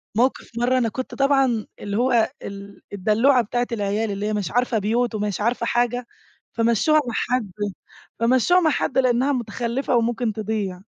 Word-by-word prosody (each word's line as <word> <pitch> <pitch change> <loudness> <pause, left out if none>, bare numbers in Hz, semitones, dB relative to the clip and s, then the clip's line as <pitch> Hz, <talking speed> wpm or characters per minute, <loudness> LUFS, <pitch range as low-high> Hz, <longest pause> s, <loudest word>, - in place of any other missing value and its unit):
موقف 250 +4 +1
مرّة 245 +2 +2
أنا 235 -3 +1
كنت 260 +4 -6
طبعًا 270 -5 +2
اللي 205 0 -3
هو 240 -2 +3
ال 200 0 -9
الدلوعة 225 +7 +3
بتاعة 240 +3 -1
العيال 210 0 -1
اللي 200 +1 -3
هي 215 - -1
مش 205 -6 -2
عارفة 245 0 +1
بيوت 230 +3 0
ومش 210 -1 -2
عارفة 235 +1 0
حاجة، 240 +1 0 0.5
فمَشوها 235 +7 +3
مع 240 - -3
حد 240 -5 -1 0.7
فمَشوها 255 +9 +4
مع 330 -3 +3
حد 275 - -1
لأنها 255 +2 +3
متخلفة 240 +1 -2
وممكن 235 -1 0
تضيع 205 -4 -3
235 Hz, 160 wpm, -22 LUFS, 210-250 Hz, 0.7 s, فمَشوها